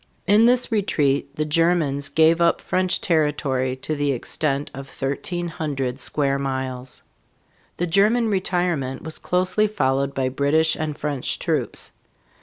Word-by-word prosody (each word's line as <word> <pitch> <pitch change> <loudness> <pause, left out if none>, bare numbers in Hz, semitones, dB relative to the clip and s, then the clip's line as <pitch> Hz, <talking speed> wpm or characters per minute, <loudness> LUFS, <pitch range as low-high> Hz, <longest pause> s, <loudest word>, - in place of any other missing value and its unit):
In 210 +4 +5
this 250 0 +3
retreat 140 -9 0
the 155 - -1
Germans 150 -3 +1
gave 160 +3 +4
up 170 0 +3
French 185 0 0
territory 145 -6 0
to 155 - -1
the 145 -2 0
extent 140 +3 -2
of 135 +1 -8
thirteen 175 +6 -3
hundred 140 -5 -3
square 140 +1 0
miles. 130 -2 -4 0.7
The 175 - 0
German 210 +7 +3
retirement 175 -9 -1
was 160 -1 -5
closely 185 +4 +1
followed 140 -7 0
by 130 -1 0
British 145 +4 +2
and 155 -2 -4
French 145 -4 -2
troops. - - -2
150 Hz, 135 wpm, -22 LUFS, 135-175 Hz, 0.7 s, In